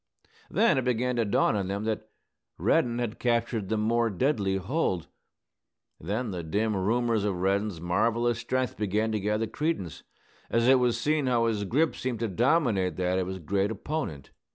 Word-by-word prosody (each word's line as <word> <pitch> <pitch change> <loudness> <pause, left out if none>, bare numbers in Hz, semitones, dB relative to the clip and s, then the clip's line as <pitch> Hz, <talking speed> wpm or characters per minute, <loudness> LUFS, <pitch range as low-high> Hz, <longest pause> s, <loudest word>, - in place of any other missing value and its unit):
Then 200 - +3
it - - -2
began 125 0 0
to 115 - +2
dawn 100 - +2
on 100 -2 -1
them 100 +2 -3
that 110 0 -3 0.5
Reddin 120 -1 +2
had 120 -1 -3
captured 115 -4 0
the 110 - +1
more 115 +2 +2
deadly 100 -2 0
hold. 95 - -1 0.9
Then 105 +7 -3
the 90 -2 -4
dim 105 +7 -1
rumors 115 +3 +1
of 100 -2 0
Reddin's 100 0 0
marvellous 115 +7 +1
strength 130 +1 -2
began 105 +2 0
to 110 - 0
gather 105 +2 0
credence, 130 - -3 0.5
as 115 +1 +2
it 130 0 +6
was 125 -2 +1
seen 150 -2 +1
how 120 -2 +2
his 105 -3 0
grip 150 - +1
seemed 125 -3 -3
to 115 - +1
dominate 115 - +1
that 90 0 0
of 90 - -2
his 95 0 -4
great 95 +4 0
opponent. 110 - -4
110 Hz, 175 wpm, -28 LUFS, 95-120 Hz, 0.9 s, it